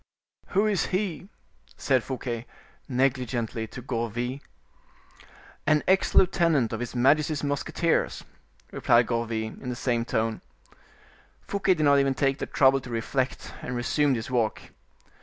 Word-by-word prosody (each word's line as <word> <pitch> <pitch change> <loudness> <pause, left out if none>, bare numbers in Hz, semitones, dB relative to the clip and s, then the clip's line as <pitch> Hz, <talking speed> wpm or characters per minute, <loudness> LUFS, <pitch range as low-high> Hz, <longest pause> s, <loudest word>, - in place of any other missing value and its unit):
"Who 205 - +5
is 210 -3 +1
he?" 185 -1 -2 0.5
said 130 -4 +1
Fouquet, 125 -3 -4 0.4
negligently, 125 -3 -1
to 125 +2 -9
Gourville. 120 +1 -3 1.3
"An 150 0 +3
ex 190 +1 +2
lieutenant 165 -10 +3
of 110 - -3
his 120 0 -5
majesty's 150 +4 +2
musketeers," 155 +4 0 0.5
replied 120 +1 +3
Gourville, 115 -2 -3
in 125 - -5
the 125 - -3
same 120 -1 0
tone. 110 -1 -1 1.0
Fouquet 195 -2 +1
did 155 - -1
not 140 -1 +5
even 135 -1 +1
take 135 0 +1
the - - -3
trouble 135 0 +4
to 125 - -10
reflect, 125 +3 -2
and 125 - -4
resumed 135 +3 +1
his 115 +2 -5
walk. 115 -4 +1
130 Hz, 135 wpm, -26 LUFS, 120-150 Hz, 1.3 s, Who